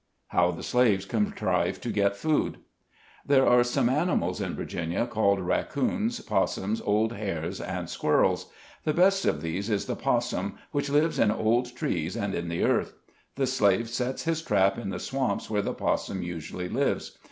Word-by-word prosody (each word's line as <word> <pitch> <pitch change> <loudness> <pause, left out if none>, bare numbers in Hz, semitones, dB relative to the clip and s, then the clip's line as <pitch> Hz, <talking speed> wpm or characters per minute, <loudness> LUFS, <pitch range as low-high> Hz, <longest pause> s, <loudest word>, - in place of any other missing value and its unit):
HOW 90 0 +3
THE 85 - -5
SLAVES 110 -6 +2
CONTRIVE 105 0 0
TO - - -3
GET 100 0 +2
FOOD. 155 +6 0 0.7
There 135 -2 +4
are 125 0 +6
some 120 -1 +1
animals 130 - 0
in - - -3
Virginia 85 +6 -2
called 105 -4 +2
rac 90 - -1
coons, 215 - -1
possums, 100 - 0
old 110 +2 +1
hares, 95 -7 -4
and - - -4
squirrels. - - +1 0.4
The 155 - 0
best 195 +2 +4
of 75 - 0
these 95 +6 -3
is 105 -2 0
the - - -2
possum, - - -1
which 145 0 -1
lives 150 +3 +2
in - - +4
old 120 +3 +1
trees 90 - -2
and 100 -1 -2
in 85 0 -3
the 85 - -1
earth. - - +1 0.4
The 135 - +1
slave 115 -3 +2
sets 125 +2 -2
his 165 -1 0
trap 95 -7 +2
in 105 -4 -4
the - - -3
swamps 130 -7 -2
where 105 -1 +2
the - - -3
possum 95 -2 -1
usually 85 +1 -5
lives. - - -1
110 Hz, 175 wpm, -27 LUFS, 95-130 Hz, 0.7 s, are